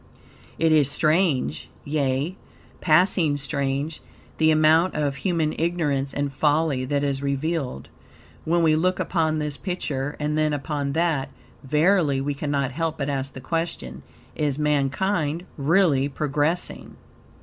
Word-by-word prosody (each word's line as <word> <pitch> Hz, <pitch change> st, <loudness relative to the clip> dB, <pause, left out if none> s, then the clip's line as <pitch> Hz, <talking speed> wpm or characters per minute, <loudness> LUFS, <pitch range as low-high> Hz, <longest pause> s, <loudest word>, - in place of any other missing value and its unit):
It 165 Hz, 0 st, +2 dB
is 150 Hz, -3 st, +4 dB
strange, 155 Hz, -, +1 dB, 0.2 s
yea, 145 Hz, +3 st, -1 dB, 0.4 s
passing 160 Hz, -2 st, +3 dB
strange, 140 Hz, +2 st, -2 dB, 0.4 s
the 160 Hz, 0 st, +4 dB
amount 155 Hz, +3 st, +4 dB
of 145 Hz, -2 st, -1 dB
human 165 Hz, -5 st, 0 dB
ignorance 150 Hz, -5 st, 0 dB
and 140 Hz, -1 st, -2 dB
folly 145 Hz, -2 st, +1 dB
that 140 Hz, +2 st, 0 dB
is 140 Hz, -1 st, -1 dB
revealed. 140 Hz, -, -2 dB, 0.6 s
When 170 Hz, +1 st, +1 dB
we 155 Hz, -1 st, +4 dB
look 180 Hz, +3 st, +1 dB
upon 160 Hz, -3 st, 0 dB
this 150 Hz, -2 st, -3 dB
picture 145 Hz, -7 st, -3 dB
and 150 Hz, 0 st, -1 dB
then 155 Hz, -1 st, +1 dB
upon 145 Hz, -1 st, -2 dB
that, 160 Hz, -4 st, 0 dB, 0.3 s
verily 150 Hz, 0 st, +2 dB
we 145 Hz, +2 st, -1 dB
cannot 140 Hz, -2 st, -1 dB
help 165 Hz, +3 st, -2 dB
but 140 Hz, 0 st, -2 dB
ask 135 Hz, -1 st, -3 dB
the 130 Hz, -, -9 dB
question, 130 Hz, -, -3 dB, 0.3 s
is 145 Hz, -3 st, -1 dB
mankind 150 Hz, +3 st, 0 dB
really 145 Hz, -2 st, +2 dB
progressing? 150 Hz, +4 st, -2 dB
150 Hz, 130 wpm, -24 LUFS, 140-160 Hz, 0.6 s, is